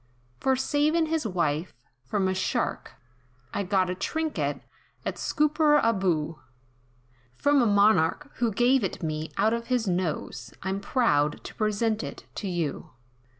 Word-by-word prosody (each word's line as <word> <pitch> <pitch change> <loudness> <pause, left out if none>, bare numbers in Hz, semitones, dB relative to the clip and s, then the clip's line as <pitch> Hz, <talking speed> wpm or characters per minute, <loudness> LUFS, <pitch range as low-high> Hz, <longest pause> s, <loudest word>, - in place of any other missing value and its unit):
"For 265 0 +2
savin' 300 +5 +2
his 315 -5 -1
wife, 170 -3 -1 0.3
from 195 +7 0
a 185 - +1
shark, 190 - -2 0.6
I - - -1
got 190 -1 +2
The 180 - -2
trinket, 315 +11 -2 0.4
at - - -3
Scooperaboo, 230 - +2 1.0
From 285 - +3
a 235 - +3
Monarch, 205 - +3
who 235 -2 +1
gave 245 +3 +3
it 185 - -3
me, 155 0 -3
out 220 +1 +3
of 235 0 -3
his 245 -3 0
nose, 165 -9 -2
I'm 190 +1 -1
proud 150 - +1
to - - -8
present 215 +1 0
it - - -7
to 205 - -4
you. 170 -6 -3
205 Hz, 140 wpm, -27 LUFS, 180-260 Hz, 1.0 s, From